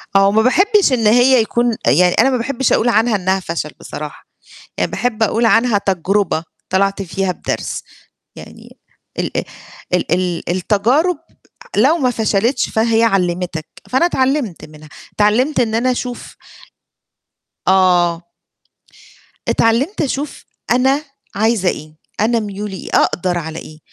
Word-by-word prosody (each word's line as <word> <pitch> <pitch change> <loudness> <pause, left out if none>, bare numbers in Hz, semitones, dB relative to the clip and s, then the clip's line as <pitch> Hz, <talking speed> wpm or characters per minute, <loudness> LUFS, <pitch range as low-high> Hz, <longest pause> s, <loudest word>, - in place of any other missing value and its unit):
آه. 195 0 +6
وما 215 +2 +3
باحبش 385 - +3
إن 230 -4 +2
هي 245 +2 +5
يكون 235 +1 0
يعني 175 +9 +4
أنا 255 +4 +3
ما 260 - +1
باحبش 255 +1 0
أقول 240 - +2
عنها 225 0 +2
إنها 190 0 0
فَشَل 165 -4 -4
بصراحة، 150 -1 -8 0.6
يعني - - 0
باحب 235 -2 -2
أقول 230 +2 +2
عنها 225 0 +3
تجربة 195 -2 0 0.3
طَلَعت 195 +1 +1
فيها 190 0 -2
بدرس، - - -4 0.5
يعني - - -13 0.4
ال - - -2
ال - - 0 0.5
ال 180 - 0
ال 180 -2 0
التجارب 235 - +1 0.6
لو 275 +10 +4
ما 255 -5 +1
فَشَلِتش 225 +2 0
فهي 225 0 +1
علِّمتك، 180 -5 -1 0.2
فأنا 260 +7 +3
اتعلّمت 265 - -1
منها، 155 0 -14 0.3
اتعلّمت 245 +7 +2
إن 220 -2 0
أنا 245 +3 +1
أشوف 250 0 -5 1.3
آه. 180 -3 +3 1.3
اتعلِّمت 245 - +1
أشوف 285 0 -3 0.3
أنا 265 +4 +2 0.3
عايزة 215 -2 +2
إيه؟ 155 -1 -7 0.2
أنا 230 +2 +2
ميولي 205 -2 -5
إيه؟ - - -9
أقدَر 180 0 +1
على 160 -1 -5
إيه؟ 155 0 -12
220 Hz, 135 wpm, -17 LUFS, 185-245 Hz, 1.3 s, آه